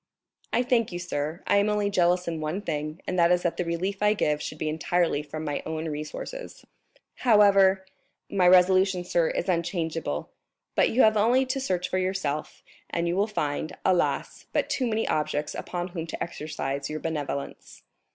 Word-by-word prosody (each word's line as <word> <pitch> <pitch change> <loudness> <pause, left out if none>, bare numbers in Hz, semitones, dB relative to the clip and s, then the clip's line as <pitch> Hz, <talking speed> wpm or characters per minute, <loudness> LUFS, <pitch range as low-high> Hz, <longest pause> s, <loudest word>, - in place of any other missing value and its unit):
"I 240 - +2
thank 240 -4 +1
you, 175 - -4
sir; 160 -1 -4
I - - +3
am 200 +1 +3
only 205 -1 0
jealous 180 -1 +2
in 165 -2 -3
one 160 +7 -3
thing, 155 -1 -4
and 180 - -1
that 170 0 +5
is 180 0 +3
that 175 - -1
the - - 0
relief 180 +4 -2
I 210 0 +4
give 150 -6 0
should 155 - -5
be 155 - -3
entirely 160 0 +1
from 155 +1 -6
my 145 -1 -2
own 160 0 -4
resources." 155 - -7 0.5
"However——" 195 -4 +5 0.4
"My 185 -3 +2
resolution, 185 0 +5
sir, 170 -2 +1
is 175 - -2
unchangeable, 165 - -2 0.4
but - - +3
you 250 - +4
have 215 0 +5
only 245 +5 +4
to 260 +1 -2
search 185 -9 -1
for 185 - -1
yourself 185 -6 -2 0.3
and 170 0 -1
you 170 - 0
will 200 +3 +2
find, 150 -7 -3
alas, 185 -2 0
but - - 0
too 255 -3 0
many 225 0 0
objects 150 0 -1
upon 175 0 -4
whom 165 -2 -5
to - - -4
exercise 140 -4 -4
your 155 0 -4
benevolence." 150 -4 -5
175 Hz, 180 wpm, -26 LUFS, 155-200 Hz, 0.5 s, that